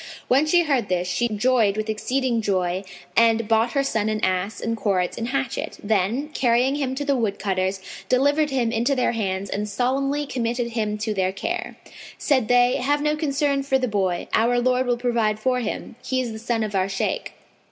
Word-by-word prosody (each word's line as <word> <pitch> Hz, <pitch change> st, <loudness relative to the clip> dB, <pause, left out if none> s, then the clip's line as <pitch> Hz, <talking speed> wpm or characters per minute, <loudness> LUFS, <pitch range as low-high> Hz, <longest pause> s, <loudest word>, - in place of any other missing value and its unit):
When 275 Hz, +5 st, +3 dB
she 345 Hz, +2 st, +4 dB
heard 270 Hz, -9 st, 0 dB
this, 180 Hz, 0 st, 0 dB
she 240 Hz, +6 st, 0 dB
joyed 215 Hz, -1 st, +2 dB
with 215 Hz, 0 st, -2 dB
exceeding 240 Hz, +2 st, 0 dB
joy 185 Hz, -2 st, 0 dB, 0.3 s
and 230 Hz, -1 st, +4 dB
bought 225 Hz, +1 st, +2 dB
her 275 Hz, -1 st, +2 dB
son 220 Hz, -5 st, 0 dB
an 215 Hz, 0 st, -1 dB
ass 185 Hz, +3 st, -1 dB
and 230 Hz, 0 st, -2 dB
cords 190 Hz, -5 st, 0 dB
and 230 Hz, -, -3 dB
hatchet; 265 Hz, -1 st, -3 dB
then, 220 Hz, +7 st, 0 dB
carrying 255 Hz, -2 st, +2 dB
him 275 Hz, -3 st, -2 dB
to 285 Hz, +2 st, -3 dB
the 280 Hz, -1 st, +2 dB
woodcutters, 195 Hz, -4 st, -1 dB, 0.3 s
delivered 285 Hz, +4 st, +3 dB
him 250 Hz, -4 st, 0 dB
into 240 Hz, +4 st, +1 dB
their 255 Hz, -, +1 dB
hands 195 Hz, -4 st, -2 dB
and 210 Hz, +2 st, -3 dB
solemnly 275 Hz, +6 st, 0 dB
committed 240 Hz, -2 st, -2 dB
him 215 Hz, -2 st, -1 dB
to 215 Hz, 0 st, -2 dB
their 190 Hz, -2 st, 0 dB
care. 345 Hz, -, -4 dB, 0.4 s
Said 260 Hz, -7 st, +1 dB
they, 245 Hz, 0 st, +4 dB
"Have 290 Hz, +3 st, 0 dB
no 300 Hz, 0 st, +2 dB
concern 285 Hz, -2 st, 0 dB
for 270 Hz, -1 st, +1 dB
the 255 Hz, -1 st, -1 dB
boy, 190 Hz, -5 st, -1 dB
our 240 Hz, +2 st, +3 dB
Lord 255 Hz, +1 st, +1 dB
will 245 Hz, -1 st, +1 dB
provide 235 Hz, -3 st, 0 dB
for 250 Hz, +2 st, +1 dB
him: 230 Hz, 0 st, -5 dB
he 260 Hz, -, -1 dB
is 245 Hz, -3 st, -2 dB
the 220 Hz, -, -7 dB
son 230 Hz, 0 st, -1 dB
of 210 Hz, -1 st, -4 dB
our 190 Hz, 0 st, +1 dB
Shaykh." 195 Hz, -, -2 dB
235 Hz, 195 wpm, -23 LUFS, 210-265 Hz, 0.4 s, she